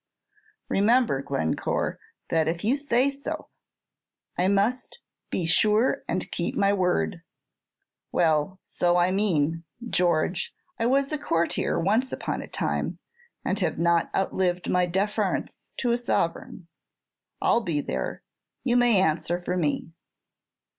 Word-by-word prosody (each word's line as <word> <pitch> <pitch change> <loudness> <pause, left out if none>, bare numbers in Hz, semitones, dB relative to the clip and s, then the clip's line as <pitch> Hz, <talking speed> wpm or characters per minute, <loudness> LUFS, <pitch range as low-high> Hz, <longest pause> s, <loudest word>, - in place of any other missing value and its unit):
"Remember, 215 - +3
Glencore, 135 - -1 0.3
that 160 -1 +2
if 170 +1 -2
you 235 +6 +3
say 280 -1 +2
so 280 0 -6 0.4
" - - -61
"I 180 - +1
must 205 - +1 0.3
be 175 - -1
sure 215 +10 +3
and 185 - -2
keep 170 - -2
my 200 0 +3
word. 180 - 0 0.9
Well, 160 +2 +2
so 175 0 +1
I 175 +1 +3
mean, 165 -5 +1 0.2
George. 175 -2 +1 0.2
I 230 - +2
was 275 +2 +2
a 305 - -1
courtier 170 - 0
once 220 +9 +1
upon - - -3
a - - -8
time, - - -2 0.5
and - - 0
have 170 -5 0
not 170 0 +2
outlived 180 -2 0
my 180 0 +3
deference 200 +2 -1
to 245 - 0
a 235 - +1
sovereign. 170 -5 -2 0.7
I - - +2
'll 235 - +3
be 165 -8 -1
there; 65 - -3 0.4
you 245 -1 +2
may 240 -5 +5
answer 170 0 +1
for 180 0 -3
me." 160 -1 -1
180 Hz, 135 wpm, -26 LUFS, 165-230 Hz, 0.9 s, may